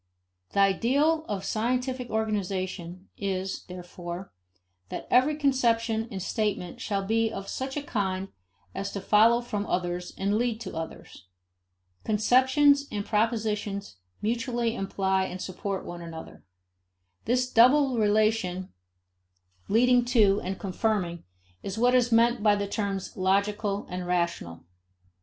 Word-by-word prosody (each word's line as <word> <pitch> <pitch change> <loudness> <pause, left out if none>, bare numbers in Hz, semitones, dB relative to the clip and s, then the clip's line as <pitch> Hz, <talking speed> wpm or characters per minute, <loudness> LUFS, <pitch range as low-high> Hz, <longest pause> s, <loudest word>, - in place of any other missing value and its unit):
The 200 - +3
ideal 280 +11 +2
of 200 -2 -3
scientific 250 +2 -1
organization 190 -4 -3
is, 190 -1 -3
therefore, 180 0 -8 0.6
that - - -5
every 265 +5 +4
conception 235 -6 +1
and 195 - -5
statement 205 -5 -2
shall 200 -2 -2
be 225 +2 +1
of 195 -2 -6
such 265 +2 -4
a 290 - -2
kind 195 -6 -2 0.4
as 200 0 -4
to 200 - -3
follow 220 +4 +4
from 210 -4 -4
others 180 0 -2
and 195 +1 0
to - - +2
lead 235 -1 0
to 190 - -6
others. 160 - -8 0.8
Conceptions 260 +6 +4
and 205 -1 -3
propositions 210 - -1 0.3
mutually 235 +1 0
imply 190 -3 0
and 185 - -6
support 190 +1 -4
one 175 0 -7
another. 165 -1 -9 0.8
This 250 +2 +1
double 255 +1 +5
relation 210 -3 +1 0.9
of - - -30
"leading 245 +3 +4
to 210 -5 +4
and 190 +1 -3
confirming" 190 -3 -2 0.4
is 195 +1 -5
what 245 +2 +3
is 245 -1 +3
meant 235 0 +4
by 205 -1 +4
the 205 0 -2
terms 200 -2 -3
logical 200 +2 0
and 180 0 -5
rational. 170 - -2
210 Hz, 130 wpm, -27 LUFS, 190-235 Hz, 0.9 s, double